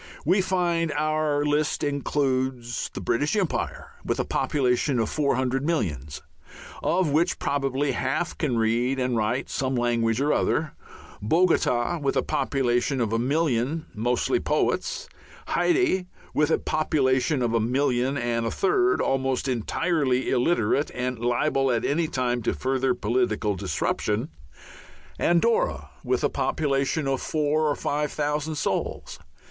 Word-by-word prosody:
We 185 Hz, +5 st, +4 dB
find 175 Hz, -3 st, 0 dB
our 155 Hz, -1 st, 0 dB
list 150 Hz, 0 st, 0 dB
includes 130 Hz, -4 st, -1 dB
the -, -, -4 dB
British 145 Hz, -, 0 dB
Empire, 195 Hz, -6 st, -2 dB
with -, -, -2 dB
a -, -, 0 dB
population 130 Hz, -1 st, +1 dB
of 115 Hz, -2 st, 0 dB
four 145 Hz, -4 st, +1 dB
hundred 130 Hz, +1 st, 0 dB
millions, 75 Hz, -, -2 dB, 0.6 s
of 175 Hz, -3 st, +1 dB
which 165 Hz, +4 st, +2 dB
probably 140 Hz, 0 st, 0 dB
half 135 Hz, +7 st, -1 dB
can 135 Hz, -7 st, -1 dB
read 120 Hz, +4 st, +1 dB
and 125 Hz, -1 st, 0 dB
write 115 Hz, +4 st, 0 dB
some 130 Hz, -1 st, -2 dB
language 120 Hz, -1 st, +1 dB
or 145 Hz, +2 st, +2 dB
other; 155 Hz, -1 st, 0 dB, 0.5 s
Bogota 160 Hz, -, +2 dB
with 140 Hz, -2 st, 0 dB
a -, -, +2 dB
population 135 Hz, -3 st, 0 dB
of 115 Hz, -2 st, 0 dB
a 115 Hz, -, +1 dB
million, 145 Hz, +2 st, 0 dB
mostly 120 Hz, -, 0 dB
poets; 485 Hz, -1 st, -1 dB, 0.4 s
Hayti 335 Hz, -, +2 dB, 0.3 s
with 150 Hz, 0 st, +2 dB
a -, -, +3 dB
population 135 Hz, -2 st, +1 dB
of 115 Hz, -1 st, 0 dB
a 115 Hz, -, +3 dB
million 130 Hz, +2 st, +1 dB
and 120 Hz, -2 st, -1 dB
a -, -, 0 dB
third, 395 Hz, -1 st, +2 dB
almost 135 Hz, 0 st, 0 dB
entirely 130 Hz, +2 st, 0 dB
illiterate 130 Hz, 0 st, +2 dB
and 125 Hz, -1 st, -2 dB
liable 135 Hz, +3 st, +1 dB
at 120 Hz, -2 st, 0 dB
any 160 Hz, +3 st, +1 dB
time 125 Hz, -5 st, -1 dB
to -, -, -1 dB
further 130 Hz, -1 st, 0 dB
political 110 Hz, -2 st, 0 dB
disruption; 105 Hz, -, -1 dB, 0.9 s
Andorra 175 Hz, +7 st, +1 dB
with -, -, 0 dB
a -, -, +3 dB
population 140 Hz, 0 st, 0 dB
of 135 Hz, -1 st, 0 dB
four 155 Hz, 0 st, +1 dB
or 145 Hz, -, +1 dB
five 150 Hz, 0 st, -2 dB
thousand 150 Hz, +1 st, -2 dB
souls. 150 Hz, -, -3 dB
135 Hz, 140 wpm, -25 LUFS, 120-155 Hz, 0.9 s, We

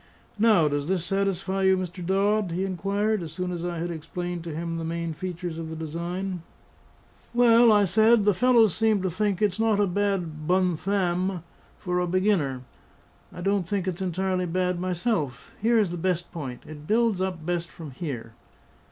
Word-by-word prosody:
"Now, 210 Hz, -8 st, +5 dB
does 145 Hz, 0 st, -1 dB
this 180 Hz, -2 st, 0 dB
satisfy 195 Hz, 0 st, -1 dB
you, 190 Hz, 0 st, +4 dB
Mr. 180 Hz, -1 st, -5 dB
Dodd?" 195 Hz, +1 st, +1 dB
he 185 Hz, +3 st, -1 dB
inquired, 200 Hz, +3 st, -1 dB
as 160 Hz, -3 st, -6 dB
soon 180 Hz, +2 st, -3 dB
as 175 Hz, -1 st, -4 dB
I 175 Hz, -1 st, -3 dB
had 170 Hz, +1 st, -3 dB
explained 175 Hz, +2 st, -5 dB
to 165 Hz, -3 st, -5 dB
him 165 Hz, +1 st, -3 dB
the 165 Hz, -, -4 dB
main 165 Hz, 0 st, -3 dB
features 175 Hz, -1 st, -5 dB
of 160 Hz, -1 st, -5 dB
the 160 Hz, -, -6 dB
design. 170 Hz, +4 st, -4 dB, 0.9 s
"Well," 235 Hz, -1 st, +6 dB
I 205 Hz, -1 st, +5 dB
said, 220 Hz, +4 st, +4 dB
"the 205 Hz, 0 st, +4 dB
fellows 230 Hz, -1 st, +4 dB
seem 220 Hz, -3 st, +2 dB
to 185 Hz, -, 0 dB
think 205 Hz, +2 st, 0 dB
it's 205 Hz, 0 st, +1 dB
not 220 Hz, -2 st, +2 dB
a 205 Hz, -, +4 dB
bad 180 Hz, -5 st, -2 dB
bonne 180 Hz, -1 st, +2 dB
femme 185 Hz, -1 st, -1 dB, 0.3 s
for 180 Hz, 0 st, -2 dB
a 180 Hz, -, 0 dB
beginner. 175 Hz, -9 st, +1 dB, 0.7 s
I 180 Hz, -, -9 dB
don't 195 Hz, -1 st, 0 dB
think 195 Hz, -1 st, -1 dB
it's 185 Hz, 0 st, -3 dB
entirely 185 Hz, 0 st, -1 dB
bad 180 Hz, +1 st, 0 dB
myself. 175 Hz, -, -2 dB
Here 230 Hz, +2 st, +3 dB
is 205 Hz, -6 st, +2 dB
the 175 Hz, -, -4 dB
best 175 Hz, 0 st, -1 dB
point; 135 Hz, -8 st, -6 dB
it 150 Hz, -1 st, -10 dB
builds 220 Hz, -3 st, +2 dB
up 180 Hz, -4 st, -3 dB
best 175 Hz, -1 st, -2 dB
from 160 Hz, -4 st, -10 dB
here. 125 Hz, -6 st, -6 dB
180 Hz, 185 wpm, -26 LUFS, 170-200 Hz, 0.9 s, Well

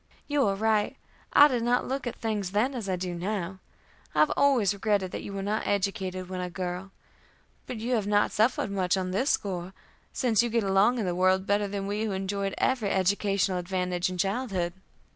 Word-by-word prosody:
"You 290 Hz, -5 st, +2 dB
are 195 Hz, -, +1 dB
right. 215 Hz, 0 st, +1 dB, 0.3 s
I 290 Hz, -, +8 dB
did 250 Hz, -5 st, -1 dB
not 240 Hz, +1 st, +1 dB
look 270 Hz, 0 st, -3 dB
at 240 Hz, -, -4 dB
things 210 Hz, -4 st, -3 dB
then 235 Hz, +7 st, +2 dB
as 225 Hz, -6 st, -4 dB
I 185 Hz, -, +1 dB
do 180 Hz, 0 st, -4 dB
now. 190 Hz, 0 st, -3 dB, 0.6 s
I -, -, +2 dB
have 155 Hz, -, +4 dB
always 250 Hz, -9 st, +3 dB
regretted 200 Hz, -2 st, 0 dB
that -, -, -4 dB
you -, -, -7 dB
were 195 Hz, 0 st, -4 dB
not 210 Hz, +2 st, -1 dB
educated 190 Hz, -2 st, -1 dB
when 185 Hz, 0 st, -4 dB
a 180 Hz, -, -3 dB
girl. 180 Hz, +1 st, -4 dB, 0.8 s
But 250 Hz, -, -5 dB
you 235 Hz, +3 st, -2 dB
have 215 Hz, -4 st, 0 dB
not 205 Hz, 0 st, +3 dB
suffered 215 Hz, -1 st, +1 dB
much 190 Hz, -1 st, +1 dB
on 185 Hz, -1 st, -2 dB
this 255 Hz, +10 st, +1 dB
score, 185 Hz, -2 st, -1 dB, 0.4 s
since 235 Hz, -4 st, +2 dB
you 240 Hz, -, 0 dB
get 230 Hz, -1 st, +1 dB
along 195 Hz, +5 st, +3 dB
in 220 Hz, -, -1 dB
the 180 Hz, -, 0 dB
world 185 Hz, +1 st, +2 dB
better 205 Hz, +1 st, +1 dB
than 200 Hz, 0 st, -4 dB
we 205 Hz, +2 st, -2 dB
who 210 Hz, -, -2 dB
enjoyed 195 Hz, +1 st, -2 dB
every 245 Hz, -6 st, +1 dB
educational 195 Hz, -1 st, +1 dB
advantage 180 Hz, 0 st, -1 dB
in 185 Hz, -, -5 dB
childhood." 195 Hz, -3 st, -1 dB
200 Hz, 205 wpm, -28 LUFS, 185-220 Hz, 0.8 s, I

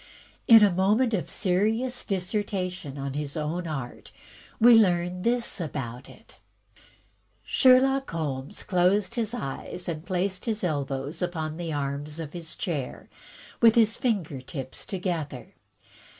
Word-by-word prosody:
In 225 Hz, -2 st, +9 dB
a 205 Hz, -, +5 dB
moment 210 Hz, +7 st, +2 dB
of 185 Hz, -, 0 dB
a -, -, -15 dB
serious 220 Hz, +7 st, 0 dB
dissertation 185 Hz, -5 st, -3 dB
on 135 Hz, -1 st, -4 dB
his 145 Hz, +1 st, -4 dB
own 165 Hz, +3 st, -2 dB
art, 135 Hz, -6 st, -6 dB, 0.5 s
we 240 Hz, +2 st, +8 dB
learn 180 Hz, -4 st, +3 dB
this 235 Hz, -2 st, 0 dB
about 135 Hz, -5 st, -5 dB
it: -, -, -17 dB, 1.0 s
Sherlock 270 Hz, +1 st, +4 dB
Holmes 145 Hz, -4 st, -4 dB
closed 185 Hz, +2 st, +2 dB
his 230 Hz, -1 st, -2 dB
eyes 180 Hz, -, -6 dB
and 160 Hz, -2 st, -4 dB
placed 185 Hz, 0 st, -2 dB
his 220 Hz, -3 st, -2 dB
elbows 140 Hz, -2 st, -2 dB
upon 160 Hz, -3 st, -3 dB
the 170 Hz, -2 st, -4 dB
arms 145 Hz, +1 st, -3 dB
of 155 Hz, -3 st, -6 dB
his 170 Hz, -2 st, -6 dB
chair, 145 Hz, -8 st, -4 dB, 0.5 s
with 230 Hz, -1 st, +7 dB
his 225 Hz, -2 st, +4 dB
finger 190 Hz, -, -1 dB
tips 130 Hz, -1 st, -7 dB
together. 170 Hz, -8 st, -4 dB
180 Hz, 135 wpm, -27 LUFS, 150-210 Hz, 1.0 s, In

